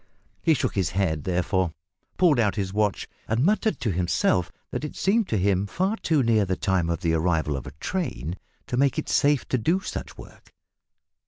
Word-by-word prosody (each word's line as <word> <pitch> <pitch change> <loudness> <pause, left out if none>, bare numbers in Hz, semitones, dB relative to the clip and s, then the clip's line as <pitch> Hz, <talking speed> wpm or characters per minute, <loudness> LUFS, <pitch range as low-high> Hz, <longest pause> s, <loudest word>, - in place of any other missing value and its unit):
He 160 -2 +4
shook - - -1
his 95 -4 0
head, 80 -7 0
therefore, 90 -1 0 0.4
pulled 165 -8 +4
out 105 -5 +2
his 95 -2 -2
watch, 105 -1 0 0.2
and 115 +5 +1
muttered 210 - +1
to 115 -3 0
himself 90 0 +1 0.2
that - - -3
it 150 - -5
seemed 210 +2 +2
to 110 - 0
him 100 +1 +1
far 190 - 0
too 160 -10 +1
near 115 -3 +3
the 95 -1 -1
time 90 -3 0
of 85 - -1
the 80 -1 +1
arrival 80 -3 +1
of 65 - -6
a - - -7
train 85 - -3 0.3
to 125 - -3
make 140 0 +2
it - - -3
safe 145 -1 +2
to 130 - +1
do 165 - +2
such - - -6
work. - - -14
100 Hz, 195 wpm, -25 LUFS, 90-145 Hz, 0.4 s, He